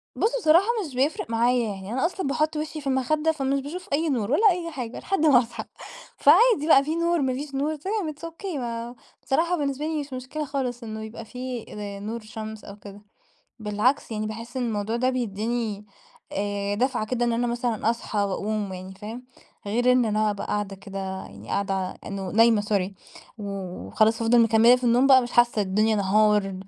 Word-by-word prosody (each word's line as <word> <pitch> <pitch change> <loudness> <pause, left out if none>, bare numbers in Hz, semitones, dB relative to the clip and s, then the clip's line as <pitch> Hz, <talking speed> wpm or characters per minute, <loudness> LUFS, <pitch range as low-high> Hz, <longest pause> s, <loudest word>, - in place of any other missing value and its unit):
بص، 460 +3 +1
بصراحة 335 +2 +5 0.2
مش 280 - -9
بيفرق 270 -1 0
معايا. 235 0 +2
يعني 190 +1 -8
أنا 260 +5 +1
أصلًا 365 -2 -2
باحط 305 +3 0
وشي 305 0 -4
في 280 - -7
المخدة 300 +4 +1
فمش 275 -2 -1
باشوف 345 +6 -7
أي 315 +2 +1
نور 230 -4 -1
ولا 415 +9 +5
أي 345 -2 -3
حاجة 250 -5 -5
لحد 385 -5 0
ما 280 -5 +7
أصحى. 240 -1 -4 0.5
فعادي 460 -11 +5
بقى، 275 -4 +7
في 310 +3 -2
نور، 335 -1 +1
ما 260 -1 +1
فيش 275 +2 -6
نور 295 +3 0
تمام، 370 +1 -3
it's 295 - -24
okay 365 +1 -6
ما 235 -1 -4 0.3
بصراحة 340 +6 +1
بالنسبة 285 0 -2
لي 315 -1 -1
مش 285 -1 -9
مشكلة 260 +4 -4
خالص 260 -3 -3
إنه 220 -1 -6
يبقى 225 +1 -8
في 250 0 -6
زي 205 -1 -6
نور 220 +3 -4
شمس 220 0 -8
أو 200 - -9
كده. 205 0 -12 0.6
بالعكس، 215 +5 0
يعني 215 0 -2
باحس 230 +4 -7
إن 255 - 0
الموضوع 215 0 -2
ده 255 +2 +2
بيديني 225 -2 -2 0.5
آآ 200 0 -2
دفعة 245 0 0
كده، 240 +2 0
إن 235 - +1
أنا 240 +1 0
مثلًا 235 -2 0
أصحى 230 -2 -2
وأقوم 200 0 -2
يعني، 185 +1 -8
فاهم؟ 220 +5 -8 0.4
غير 240 +5 +2
إن 250 -1 +4
أنا 215 0 +1
أبقى 200 - -5
قاعدة 205 -1 -2
كده 195 0 -8
يعني 190 - -7
قاعدة 195 -1 0
ع 185 -1 -2
إنه 195 -1 -5
نايمة 225 -1 +5
sorry، 200 -2 0 0.5
وخلاص 200 +3 -1
أفضل 235 +1 +4
مكملة 230 +2 +6
في 250 - -7
النوم 245 +2 +4
بقى 260 -2 +7
مش 240 - -5
حاسة 240 -3 +3
الدنيا 215 +3 +2
نهار، 205 0 +3
235 Hz, 195 wpm, -25 LUFS, 210-275 Hz, 0.6 s, ما